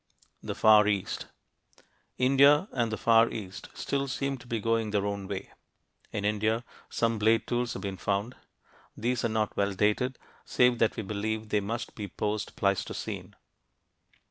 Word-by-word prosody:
THE - - -5
FAR 105 -1 +6
EAST 100 -3 -1 0.9
India 140 +6 +5
and 120 -3 0
the 110 - -2
Far 115 0 +5
East 95 -3 -7
still 140 0 -2
seem 135 +1 -2
to 125 - -15
be 115 -2 -1
going 115 0 0
their 100 -1 0
own 100 -1 -3
way. 95 -1 -5 0.6
In 100 -1 -3
India, 110 +2 +1 0.3
some 115 -1 0
blade 110 +2 +3
tools 120 0 -1
have - - -7
been 95 -1 -4
found. 100 +6 -1 0.6
These 120 +2 -1
are 115 - +1
not 110 -1 -1
well 100 0 +1
dated, 105 +6 +1 0.3
save 125 -1 +3
that 115 - +2
we 110 - -4
believe 110 +2 -3
they 105 - +2
must 115 +4 -4
be 105 -2 -6
post 105 +1 -3
Pleistocene. 100 -1 -2
110 Hz, 160 wpm, -29 LUFS, 105-120 Hz, 0.9 s, FAR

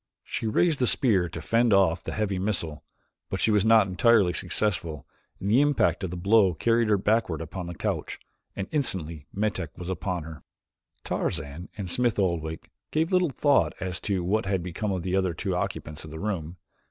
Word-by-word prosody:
She 115 - -3
raised 155 +8 +2
the 125 - +2
spear 95 -11 +3
to 80 - -7
fend 115 +5 +3
off 90 -4 +3
the - - -6
heavy 100 -3 -1
missile, 85 -7 -2 0.5
but - - -3
she 110 - +3
was 105 -2 +3
not 110 -1 +6
entirely 95 0 +3
successful, 80 -6 -2 0.3
and 95 - -4
the 125 +5 +5
impact 140 -8 +2
of 95 - -2
the 90 - -5
blow 95 0 +4
carried 115 +6 +2
her 105 -1 +3
backward 105 -4 +1
upon 85 +2 -6
the 85 - -6
couch, - - -3 0.4
and 95 - -4
instantly 85 - -1
Metak 95 -6 -2
was 90 0 -6
upon 90 -2 -3
her. 80 0 -10 0.6
Tarzan 75 +5 -3
and 100 -3 -4
Smith 120 +5 +1
Oldwick 80 -5 -2 0.2
gave 160 +3 0
little 180 -2 +3
thought 140 +1 +2
as 90 -2 -3
to 95 -3 -1
what 100 +3 0
had 95 -3 0
become 95 +4 -3
of 90 -3 -2
the 95 +1 -1
other 95 -3 +1
two - - -2
occupants 75 0 -4
of 80 - -9
the 80 +1 -8
room. 90 -4 -3
95 Hz, 190 wpm, -26 LUFS, 85-110 Hz, 0.6 s, not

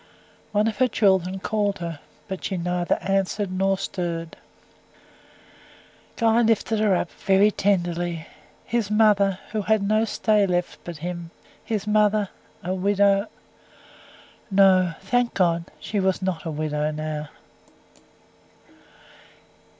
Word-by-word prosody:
One 210 +1 +2
of 220 -2 -2
her 255 - +4
children 190 -5 +2
called 205 0 -1
her, 170 -3 -5 0.3
but 190 -3 -6
she 190 - -2
neither 175 0 0
answered 195 0 0
nor 195 +1 +1
stirred. 170 -4 -4 1.8
Guy 230 0 +3
lifted 225 -1 +1
her 210 -3 +3
up, 175 - -2
very 195 +2 +3
tenderly; 175 -4 -1 0.4
his 230 -3 -1
mother, 210 -3 +3
who 215 -1 -1
had 215 0 +1
no 215 +2 +3
stay 210 -2 +2
left 175 -1 -1
but 175 -2 -7
him 170 -1 -5 0.3
his 215 -3 -3
mother 210 -1 +2 0.3
a 180 +2 -2
widow 200 +2 +2 1.2
No, 190 -3 +4
thank 240 +5 0
God! 170 -3 +2
she 210 - -3
was 190 -1 +1
not 185 -3 -3
a - - -2
widow 150 -1 -1
now. 155 -1 -4
195 Hz, 120 wpm, -24 LUFS, 175-210 Hz, 1.8 s, her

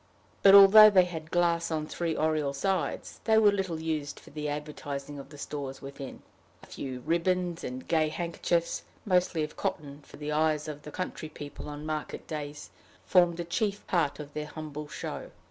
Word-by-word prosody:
But, 195 0 +8
although 205 +2 +10
they 185 -3 +5
had 160 -3 -7
glass 170 -1 +2
on 155 -2 -1
three 165 +1 -2
oriel 155 -3 +1
sides, 190 +6 -2
they 220 -1 +4
were 210 -2 +6
little 190 -5 -2
used 155 -3 -3
for - - -16
the 150 0 -3
advertising 145 -1 -5
of 135 - -10
the 145 - -12
stores 140 -2 -5
within. 135 -1 -9 0.4
A - - -10
few 130 -2 -6
ribbons 175 +2 0
and 130 +1 -6
gay 155 -2 +2
handkerchiefs, 170 +1 -1 0.2
mostly 180 -4 +2
of 150 - -6
cotton, 145 -1 -4
for - - -15
the 150 +1 -4
eyes 155 0 +1
of 150 -1 -6
the 150 - -9
country 175 -2 -5
people 145 -1 -8
on 145 +1 -7
market 155 -1 -4
days, 150 -1 -6 0.3
formed 175 -2 +4
the 175 - -3
chief 200 +4 -1
part 165 -6 0
of 145 -1 -8
their 150 0 -4
humble 150 -1 -7
show. - - -6
155 Hz, 180 wpm, -29 LUFS, 145-175 Hz, 0.4 s, although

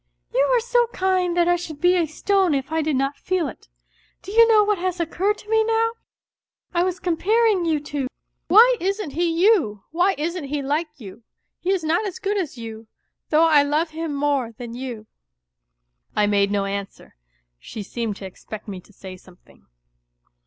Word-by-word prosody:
" - - -52
You - - +3
are - - +4
so 485 0 +2
kind 370 -4 0
that 345 0 +3
I 350 - +4
should 325 -4 -7
be 355 +3 +4
a 340 -3 +1
stone 375 +1 +1
if 270 +2 -3
I 320 0 +1
did 310 -2 0
not 275 +2 -1
feel 365 -4 -1
it. 240 - -11 0.6
Do 390 - -8
you 460 +2 +6
know 435 -2 +5
what 415 -2 0
has 365 0 -2
occurred 375 +5 0
to 420 - -16
me 445 0 +3
now? 455 +1 +1 0.8
I 345 0 +2
was 370 0 -2
comparing 395 +3 +2
you 315 -2 +1
two. 290 -2 -4 0.4
Why 475 +5 +7
isn't 390 -2 -2
he 345 +4 0
you? 330 - +2
_ - - -18
good 360 0 +2 2.2
as 315 -8 -4
you, 225 -1 -7 0.5
though 315 +1 +4
I 310 -3 +6
love 300 +3 0
him 320 -2 -4
more 280 -5 0
than 235 +1 -8
you." 240 -3 -6 1.1
I 210 - +3
made 200 -1 +2
no 200 -1 0
answer. 195 0 -6 0.5
Sli^e^m?3!^^e^pe^rT3erfo 205 - -7
say 190 -1 -9
something. 185 -1 -21
325 Hz, 155 wpm, -22 LUFS, 240-380 Hz, 2.2 s, Why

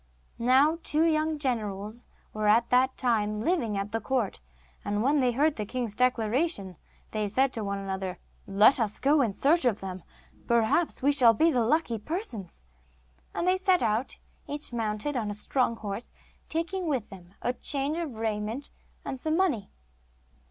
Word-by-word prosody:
Now 270 +7 +4
two 310 0 +1
young 315 -1 +1
generals 220 -4 -3 0.3
were 215 0 -1
at 225 +3 +4
that 260 +1 +3
time 215 -4 0
living 235 - 0
at 200 +1 -3
the 225 0 -2
court, 245 -2 -1 0.4
and 205 +1 -1
when 285 +3 +3
they 250 -2 +3
heard 290 +5 +1
the 215 - -2
king's 240 -3 -3
declaration, 240 - 0 0.4
they 215 -1 -1
said 260 +6 +1
one 200 -2 -2
to 195 - -6
the 195 - -4
other: 190 -1 -4 0.3
'Let 210 +7 +5
us 215 -3 -1
go 290 +2 +4
in 230 -5 +1
search 295 - +2
of 235 -5 +2
them; 185 -1 -6 0.5
perhaps 235 +7 +2
we 285 - +5
shall 245 -5 +6
be 325 +8 +4
the 245 -5 +2
lucky 240 -2 +1
persons.' 220 - -6 0.7
And 350 - -1
they 370 +1 +4
set 375 - +2
out, 225 +3 0 0.3
each 290 -3 -5
mounted 225 +4 -2
on 220 -4 -1
a 205 - -4
strong 230 +3 0
horse, 215 +1 -6 0.4
taking 335 +3 -2
with 265 -8 -1
them 185 0 -13
a 245 - +1
change 285 +4 -1
of 310 -8 -4
raiment 220 +4 -3 0.3
and 265 - -4
some 315 +4 0
money. 325 - +1
240 Hz, 175 wpm, -28 LUFS, 210-290 Hz, 0.7 s, shall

